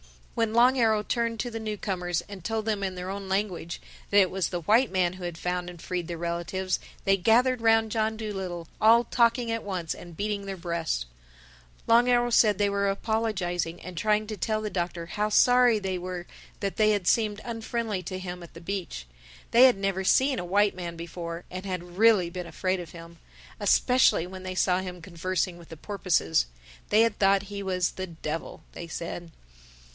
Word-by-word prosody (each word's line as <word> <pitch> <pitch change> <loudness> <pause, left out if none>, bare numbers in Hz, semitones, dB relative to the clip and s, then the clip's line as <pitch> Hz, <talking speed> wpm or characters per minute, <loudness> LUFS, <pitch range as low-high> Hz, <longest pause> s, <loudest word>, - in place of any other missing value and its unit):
When 225 -1 0
Long 250 +2 +5
Arrow 220 -2 +3
turned 230 0 -1
to 245 - -4
the 225 - -4
newcomers 190 -5 -2
and 195 -1 -11
told 220 +2 -2
them 215 -2 -1
in 190 -1 -2
their 180 +1 -5
own 195 -1 -6
language 190 -4 -2 0.3
that 205 - +2
it 190 -2 +5
was 190 -1 0
the 175 -1 -3
white 225 +9 +4
man 185 -2 +1
who 185 -1 -10
had 175 -2 -4
found 180 0 -2
and 175 -1 -11
freed 175 0 -4
their 170 -1 -5
relatives, 175 +2 -2 0.2
they 195 0 +3
gathered 240 +5 +3
round 225 -1 +3
John 220 0 0
Dolittle, 190 -6 -5
all 230 +2 +6
talking 235 0 +2
at 230 0 -1
once 185 -5 -3
and 170 -2 -12
beating 205 -1 -2
their 195 -1 -4
breasts. 170 - -2 0.8
Long 240 +2 +5
Arrow 240 0 +3
said 210 -4 +5
they 205 -1 +2
were 200 0 +1
apologizing 195 -5 -1
and 180 -1 -8
trying 215 +4 +1
to 215 -1 -5
tell 215 +3 -1
the 210 - -3
Doctor 175 -2 -3
how 210 +5 -1
sorry 245 +1 +5
they 190 -3 -3
were 180 -1 -5 0.4
that 200 -1 -2
they 215 -1 +4
had 205 -4 0
seemed 210 +1 +2
unfriendly 225 -3 -3
to 185 +1 -5
him 180 -1 -6
at 170 - -13
the 165 - -10
beach. 180 - -4 0.5
They 240 +3 +8
had 250 -5 +5
never 195 -1 -1
seen 260 +6 +3
a 180 - -4
white 200 +3 +3
man 175 -2 -6
before 170 0 -6
and 185 +1 -5
had 180 -1 -6
really 215 -6 +5
been 180 -1 -5
afraid 185 +1 -1
of 175 -2 -7
him—especially 170 +6 0
when 185 +1 -9
they 185 0 -5
saw 185 0 +2
him 180 -1 -6
conversing 180 +1 -2
with 170 - -15
the 165 - -9
porpoises. 160 - 0 0.4
They 215 - +5
had 230 -2 +1
thought 195 0 +4
he 200 0 -6
was 185 -2 0
the 185 0 -5
Devil, 165 -1 -6
they 170 - -8
said. 170 +1 -6
190 Hz, 195 wpm, -27 LUFS, 175-215 Hz, 0.8 s, They